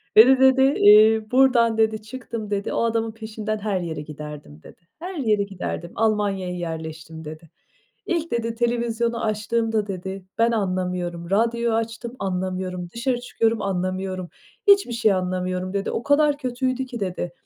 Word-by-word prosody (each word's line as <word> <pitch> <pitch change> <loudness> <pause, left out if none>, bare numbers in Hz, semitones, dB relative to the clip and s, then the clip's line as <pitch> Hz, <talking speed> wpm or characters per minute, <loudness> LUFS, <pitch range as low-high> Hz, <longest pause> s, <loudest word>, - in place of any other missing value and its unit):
"Beni" 255 +4 +8
dedi, 265 0 +5 0.2
"eee, 215 +1 +6
buradan" 250 -3 +4
dedi, 220 -1 +2
"Çıktım." 225 -1 -7
dedi. 200 0 -2
"O - - +1
adamın 225 -1 0
peşinden 220 -1 -4
her 205 -2 -1
yere 160 -3 -4
giderdim." 150 - -9
dedi. - - -15 0.2
"Her 365 +3 -6
yere 215 -9 +1
giderdim, 180 -3 -5
Almanya'ya 205 -4 0
yerleştim." 160 -2 -6
dedi." 155 +1 -9 0.6
İlk" 335 -2 -2
dedi, 230 -1 -1
"televizyonu 235 0 -1
açtığımda" 220 0 0
dedi, 190 0 -6
"Ben 230 +1 +3
anlamıyorum, 180 -4 -2
radyo 235 +2 +1
açtım 225 +2 -3
anlamıyorum, 185 -1 -3
dışarı 240 +5 -1
çıkıyorum 230 -2 0
anlamıyorum, 185 -1 -2 0.4
hiçbir 395 -11 +5
şey 225 -3 +3
anlamıyorum." 185 0 -2
dedi. 200 0 -1
"O 235 - -3
kadar 290 0 +3
kötüydü 255 -1 -2
ki." 245 -2 -7
dedi, 180 -3 -3
215 Hz, 145 wpm, -23 LUFS, 185-235 Hz, 0.6 s, Beni